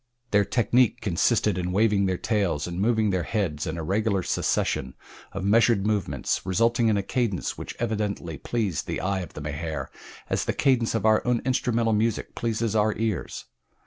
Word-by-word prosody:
Their 105 -1 +4
technic 120 +1 +2
consisted 90 -1 +1
in 90 0 -2
waving 100 0 +3
their 95 -1 0
tails 100 -10 0
and 90 +1 -4
moving 110 -1 +2
their 95 -1 0
heads 85 -5 -2
in 80 +1 -3
a 80 - -4
regular 100 +2 0
succession 65 -5 -1 0.4
of 100 - -5
measured 110 0 +3
movements 95 - -1
resulting 115 +5 +2
in 110 -2 +3
a 100 - -1
cadence 110 -3 -1
which - - -7
evidently 105 - -3
pleased 105 -10 -2
the - - -2
eye 95 +2 -1
of 90 -4 -7
the 75 - -7
Mahar 75 +2 -4 0.4
as - - -1
the - - 0
cadence 125 -5 +2
of 110 - -1
our 110 0 +5
own 125 -1 +1
instrumental 120 -3 +1
music 110 +1 0
pleases 115 -1 -1
our 105 0 +2
ears. 110 -3 -3
105 Hz, 175 wpm, -25 LUFS, 90-115 Hz, 0.4 s, our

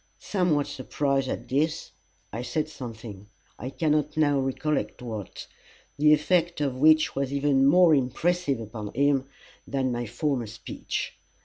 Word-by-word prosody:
Somewhat 175 -7 0
surprised 135 0 -1
at - - -4
this, 155 +4 -1 0.4
I 115 - -3
said 150 +5 -2
something, 110 -8 -9 0.3
I 125 - -4
cannot 150 +1 0
now 145 -3 +3
recollect 135 0 -2
what, 110 -5 -6 0.5
the 150 +1 +4
effect 170 +2 +2
of 140 -3 -1
which 155 +3 +4
was 140 -1 -1
even 140 -1 +3
more 175 +2 +6
impressive 140 +2 +1
upon 110 -1 -7
him 140 0 +2 0.4
than 130 -2 -1
my 120 -1 -3
former 135 -1 -1
speech. 110 +2 -5
140 Hz, 135 wpm, -26 LUFS, 125-150 Hz, 0.5 s, more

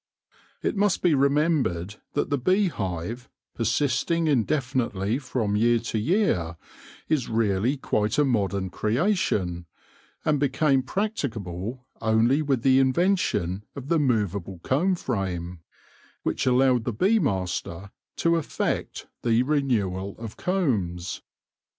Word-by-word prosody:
It - - 0
must 205 -1 +1
be 175 -3 +4
remembered 140 - +1 0.2
that - - -1
the 145 - +2
bee 185 +8 +2
hive, 100 - -4 0.2
persisting 140 +8 +1
indefinitely 125 -5 0
from 125 -6 -1
year 120 +3 +4
to 115 -1 -2
year, 105 - +1 0.5
is 150 -6 0
really 110 +3 +1
quite 105 -4 0
a 150 - +4
modern 100 -6 0
creation, 105 - 0 0.6
and 150 -2 +2
became 140 0 +2
practicable 125 - -3 0.2
only 115 +6 +3
with 135 -6 0
the 130 -1 +5
invention 130 - +1
of 140 0 -7
the 165 - +3
movable 100 - 0
comb 180 +8 +2
frame, 90 - -3 0.6
which - - -1
allowed 125 -2 +3
the 120 - -1
bee 200 - +3
master 95 - -2 0.2
to 170 0 +2
effect 160 - -2 0.2
the 115 0 +3
renewal 105 -10 0
of 110 -2 -7
combs. 100 - -1
120 Hz, 120 wpm, -25 LUFS, 100-145 Hz, 0.6 s, the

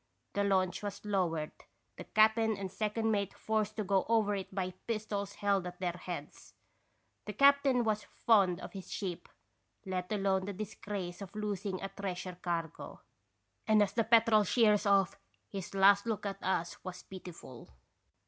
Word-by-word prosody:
The 200 - +1
launch 190 -2 +1
was 205 0 -6
lowered, 175 -7 0 0.4
the - - -9
cap'n 220 0 +3
and 195 -2 -5
second 220 +1 -1
mate 200 -2 -1
forced 215 -1 -1
to 215 - -2
go 195 -1 +2
over 220 -3 +3
into 195 -2 -4
it - - -15
by 185 -1 -2
pistols 210 -3 -2
held 200 -3 +1
at 180 0 -9
their 180 -2 0
heads. 170 -4 -8 0.7
The 210 - -5
cap'n 275 0 +5
was 215 -2 0
fond 195 -6 +3
of - - -8
his 195 -2 -8
ship, 185 -4 -4 0.6
let 185 0 -3
alone 195 -2 +1
the 200 - -4
disgrace 200 -2 -5
of 200 0 -9
losing 200 -3 -3
a 195 - -3
treasure 185 -2 -5
cargo, 165 -3 -4 0.7
and 215 -1 +6
as 200 -1 -2
the 230 - +2
Petrel 225 -1 +5
sheers 210 0 +3
off 195 -1 +3 0.3
his 195 -1 -6
last 200 +2 +5
look 220 -2 -2
at 195 0 -4
us 175 -2 -2
was 180 -1 -7
pitiful. 175 -9 -10
200 Hz, 165 wpm, -32 LUFS, 185-215 Hz, 0.7 s, and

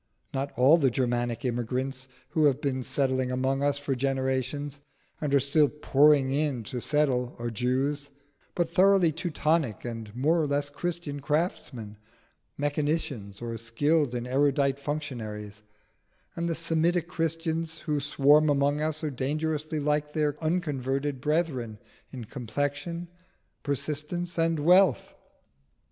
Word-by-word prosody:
Not 135 +1 -2
all 140 +7 +6
the 135 -4 +4
Germanic 120 -1 -1
immigrants 130 +2 -2 0.2
who 155 -2 +2
have 140 -2 +3
been 135 -3 -1
settling 130 -1 0
among 130 +2 0
us 140 0 +2
for 145 -1 -2
generations, 135 +2 -2 0.4
and 150 -2 -1
are 140 - +5
still 140 +2 +3
pouring 145 -2 +4
in 140 -4 0
to 125 +2 -5
settle, 130 -4 +1
are 120 0 -3
Jews, 135 +5 -1 0.5
but 170 -1 -1
thoroughly 190 -2 +5
Teutonic 155 - -1
and 115 -2 -6
more 155 +7 +2
or 150 - 0
less 145 0 0
Christian 160 -1 -4
craftsmen, 140 - -2 0.6
mechanicians, 145 -8 -2
or 115 -1 -4
skilled 130 +5 +1
and 120 0 -3
erudite 140 +1 +2
functionaries; 110 -9 -5 0.7
and 170 0 -2
the 165 - 0
Semitic 165 +1 +1
Christians 165 0 -2
who 150 -2 -1
swarm 145 +2 +4
among 145 +1 +2
us 155 0 -2
are 155 - -1
dangerously 155 +3 -2
like 150 0 0
their 150 -2 +1
unconverted 145 -5 -1
brethren 145 -8 -1 0.3
in 125 -3 -7
complexion, 145 +8 -3 0.5
persistence, 155 +5 -3
and 165 0 +2
wealth. 180 -2 +4
145 Hz, 130 wpm, -28 LUFS, 130-155 Hz, 0.7 s, all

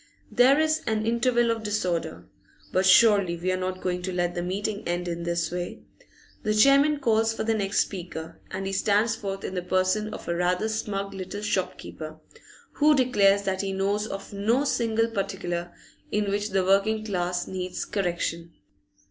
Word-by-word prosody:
There 260 +4 +5
is 315 0 +2
an 220 -1 0
interval 235 0 +2
of 225 -1 -2
disorder. 180 -6 -2 0.5
But 185 +1 +2
surely 200 -4 +5
we 180 +2 -1
are - - +1
not 185 0 -3
going 180 -1 -2
to 185 +1 -3
let 175 -1 -1
the 175 - -3
meeting 200 +4 -3
end 175 +1 -2
in 170 0 -3
this 170 -1 -1
way. 175 0 -5 0.6
The 215 0 0
chairman 275 +6 +5
calls 225 -3 +2
for - - -2
the 225 0 +1
next 205 -2 +1
speaker, 170 -4 -6
and 195 +1 -4
he 195 - -3
stands 210 +3 +2
forth 195 -2 -5
in - - -4
the 180 - -2
person 185 +4 0
of - - -8
a 170 - 0
rather 180 +5 0
smug 200 -2 -3
little 195 +2 -6
shopkeeper, 180 -5 -4 0.5
who 300 0 +4
declares 200 -7 +3
that 190 -1 -1
he 195 -1 -3
knows 200 +2 0
of 195 0 -7
no 225 +7 +1
single 225 -4 +1
particular 185 -5 -3 0.4
in 205 -1 0
which 205 +1 -1
the 190 -1 +1
working 215 +3 +2
class 180 -3 -1
needs 185 -1 -4
correction. 170 -3 -2
195 Hz, 175 wpm, -26 LUFS, 180-220 Hz, 0.6 s, There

